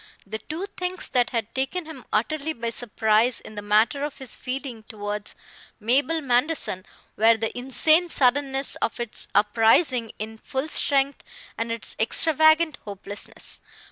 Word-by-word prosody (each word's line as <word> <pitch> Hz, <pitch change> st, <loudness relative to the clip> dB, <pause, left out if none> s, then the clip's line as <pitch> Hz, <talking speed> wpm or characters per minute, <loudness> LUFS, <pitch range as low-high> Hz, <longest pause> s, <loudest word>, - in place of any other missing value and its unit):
The 220 Hz, +2 st, -5 dB
two 325 Hz, -, -5 dB
things 360 Hz, 0 st, -3 dB
that 245 Hz, -2 st, +2 dB
had 230 Hz, -2 st, -3 dB
taken 270 Hz, +7 st, -1 dB
him 315 Hz, 0 st, -10 dB
utterly 310 Hz, 0 st, 0 dB
by 230 Hz, -2 st, -4 dB
surprise 225 Hz, 0 st, +1 dB
in -, -, -12 dB
the 205 Hz, -, -6 dB
matter 215 Hz, +7 st, +2 dB
of 295 Hz, -1 st, -4 dB
his 265 Hz, -2 st, -3 dB
feeling 255 Hz, -3 st, -5 dB
towards 205 Hz, -1 st, -4 dB, 0.4 s
Mabel 280 Hz, +9 st, +2 dB
Manderson 250 Hz, -, 0 dB, 0.3 s
were 225 Hz, +1 st, +5 dB
the 225 Hz, 0 st, -3 dB
insane 310 Hz, +7 st, +3 dB
suddenness 270 Hz, 0 st, +2 dB
of 230 Hz, -, -2 dB
its 240 Hz, -2 st, -6 dB
uprising 225 Hz, +3 st, +3 dB
in 220 Hz, +1 st, -6 dB
full 265 Hz, +6 st, -3 dB
strength 280 Hz, -1 st, +1 dB, 0.3 s
and 230 Hz, 0 st, -3 dB
its 230 Hz, -1 st, -4 dB
extravagant 315 Hz, +5 st, +4 dB
hopelessness. 205 Hz, 0 st, -6 dB
245 Hz, 140 wpm, -24 LUFS, 220-290 Hz, 0.4 s, were